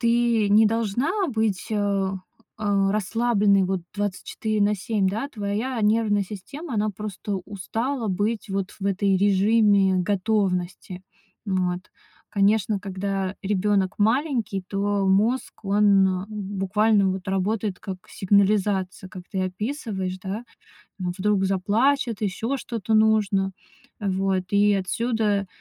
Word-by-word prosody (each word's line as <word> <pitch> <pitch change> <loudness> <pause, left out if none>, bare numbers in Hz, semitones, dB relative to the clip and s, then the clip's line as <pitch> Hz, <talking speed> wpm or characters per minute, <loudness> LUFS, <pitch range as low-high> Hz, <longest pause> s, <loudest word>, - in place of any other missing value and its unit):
ты 235 -2 +2
не 215 +2 +6
должна 240 - 0
быть, 220 -5 -1
э 200 -2 0 0.5
э, 200 -2 +1
расслабленной, 210 -2 +2
вот, 190 -1 -1
24 205 +1 -2
на 210 0 +2
7, 200 -1 0
да, 225 +8 -3
твоя 220 +2 -3
нервная 210 -1 +2
система, 230 - -7
она 210 0 +1
просто 205 0 -5
устала 225 +5 -3
быть 205 +4 -1
вот 195 -1 -2
в 195 - -3
этой 195 0 +2
режиме 200 0 +4
готовности. 185 -2 -1 0.4
М, 185 -2 +1
вот. 180 +1 -8 0.4
Конечно, 205 0 +2
когда 195 0 -3
ребёнок 195 -1 +1
маленький, 225 -3 +1
то 200 0 0
мозг, 215 +4 +1
он 195 -2 +3
буквально, 205 0 +1
вот, 190 +1 -5
работает 195 +1 -1
как 190 -3 -5
сигнализация, 195 -1 +1
как 185 -1 -10
ты 190 -1 -1
описываешь, 190 -2 -3
да. 205 +5 -4 0.5
Вдруг 190 +2 0
заплачет, 220 +5 +1
ещё 220 +6 -1
что-то 225 -4 -3
нужно. 210 -3 +3 0.5
Вот, 195 -1 0
и 205 0 +4
отсюда 205 +1 0
205 Hz, 115 wpm, -24 LUFS, 190-220 Hz, 0.5 s, не